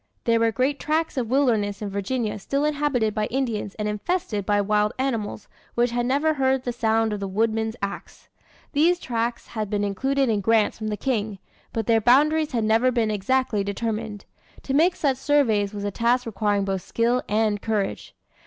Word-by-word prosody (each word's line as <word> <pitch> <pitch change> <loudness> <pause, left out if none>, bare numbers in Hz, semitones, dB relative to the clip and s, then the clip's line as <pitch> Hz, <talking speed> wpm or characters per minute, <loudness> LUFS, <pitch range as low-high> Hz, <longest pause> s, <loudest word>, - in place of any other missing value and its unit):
There 230 -1 +2
were 230 0 +3
great 265 +5 0
tracts 320 +2 -1
of 245 -4 -2
wilderness 225 -7 +1
in 205 -2 -5
Virginia 210 +2 -2
still 280 +8 -1
inhabited 285 -7 0
by 210 0 -1
Indians 230 -6 -2
and 210 -1 -3
infested 210 - -2
by 205 -1 +3
wild 210 +1 +1
animals, 230 -6 -2 0.3
which 240 0 +2
had 240 0 -1
never 290 +4 +2
heard 265 -2 +1
the 245 - -3
sound 225 -2 +1
of 205 - -3
the 200 - -3
woodman's 220 +2 0
axe. 200 0 -6 0.5
These 335 +4 +3
tracts 235 -3 -3
had 215 -3 -4
been 205 -1 -1
included 265 +7 0
in 215 -3 +1
grants 220 +1 +2
from 215 - -4
the 210 -1 -2
King, 215 -6 -2 0.3
but 225 -2 -2
their 225 0 +3
boundaries 300 +6 +4
had 235 -4 0
never 225 +4 +3
been 230 -3 +1
exactly 215 +1 0
determined. 215 0 -4 0.4
To 270 - -3
make 340 +6 +4
such 275 -4 0
surveys 235 -9 +2
was 205 -1 -6
a 205 - -2
task 240 +4 +1
requiring 205 -2 0
both 195 -1 -2
skill 235 +5 0
and 210 -1 +1
courage. 210 -3 -2
225 Hz, 185 wpm, -24 LUFS, 210-260 Hz, 0.5 s, boundaries